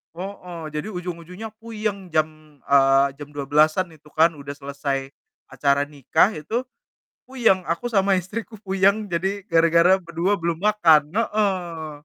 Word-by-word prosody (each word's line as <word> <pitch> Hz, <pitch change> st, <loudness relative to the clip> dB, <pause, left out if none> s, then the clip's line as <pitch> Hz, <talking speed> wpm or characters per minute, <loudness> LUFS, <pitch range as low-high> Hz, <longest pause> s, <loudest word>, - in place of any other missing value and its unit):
Heeh. 180 Hz, -2 st, -7 dB
Jadi 150 Hz, +6 st, -4 dB
ujung-ujungnya 180 Hz, +2 st, -7 dB
puyeng. 215 Hz, -4 st, -4 dB
Jam, 155 Hz, -2 st, -2 dB
eee, 135 Hz, 0 st, +4 dB
jam 145 Hz, -, -7 dB
12:00-an 155 Hz, +5 st, +2 dB
itu 155 Hz, -1 st, -19 dB
kan, 165 Hz, +2 st, +5 dB
udah 140 Hz, -2 st, -8 dB
selesai 140 Hz, -1 st, -4 dB, 0.4 s
acara 140 Hz, +2 st, +2 dB
nikah 145 Hz, -, +1 dB
itu, 215 Hz, -, -3 dB, 0.6 s
puyeng. 230 Hz, -8 st, +1 dB
Aku 170 Hz, +9 st, -2 dB
sama 195 Hz, -3 st, +3 dB
istriku 200 Hz, +6 st, -4 dB
puyeng, 195 Hz, +1 st, +1 dB
jadi 190 Hz, +4 st, -1 dB
gara-gara 170 Hz, +3 st, +5 dB
berdua 175 Hz, +3 st, -1 dB
belum 170 Hz, +1 st, -2 dB
makan. 165 Hz, -8 st, +4 dB
Heeh. 185 Hz, -7 st, -1 dB
170 Hz, 130 wpm, -23 LUFS, 150-195 Hz, 0.6 s, kan